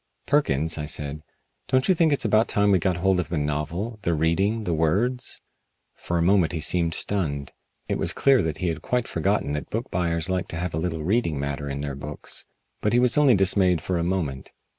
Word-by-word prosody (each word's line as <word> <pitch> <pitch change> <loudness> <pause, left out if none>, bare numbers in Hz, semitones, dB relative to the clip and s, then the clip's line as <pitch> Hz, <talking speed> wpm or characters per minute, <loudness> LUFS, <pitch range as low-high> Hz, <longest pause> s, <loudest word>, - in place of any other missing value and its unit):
"Perkins," 80 - +1
I 75 - -3
said, 75 0 -3 0.5
"don't 130 0 +2
you 190 - +5
think 165 -2 +3
it 145 - +3
is - - -1
about 110 +1 +3
time 100 0 +2
we 95 - +4
got 90 0 0
hold 95 +1 +2
of 85 -4 -2
the 85 - -2
novel 75 +10 -3
the 85 -4 0
reading, 95 +8 +1
the 90 - -1
words?" 100 +11 0 0.5
For 85 - -3
a 85 - +2
moment 90 -2 +3
he 80 - -2
seemed 85 +1 +1
stunned. 70 -9 -2 0.4
It - - -1
was - - +1
clear 135 -2 +4
that 80 -1 -2
he 90 - -1
had 80 - -4
quite 125 -2 -1
forgotten 100 -7 0
that 75 - -4
book 115 +4 -4
buyers 85 -2 -1
like 95 -1 -1
to 80 - -5
have 90 0 -3
a - - -2
little 80 -2 -3
reading 85 -5 0
matter 70 0 -3
in 70 +1 -4
their 70 -1 -3
books. 70 +2 -7 0.3
But 105 - +1
he 120 - +5
was 125 -1 +3
only 145 -5 +5
dismayed 95 -2 +3
for 90 +1 -2
a - - 0
moment. 85 -7 -3
85 Hz, 225 wpm, -24 LUFS, 75-105 Hz, 0.5 s, you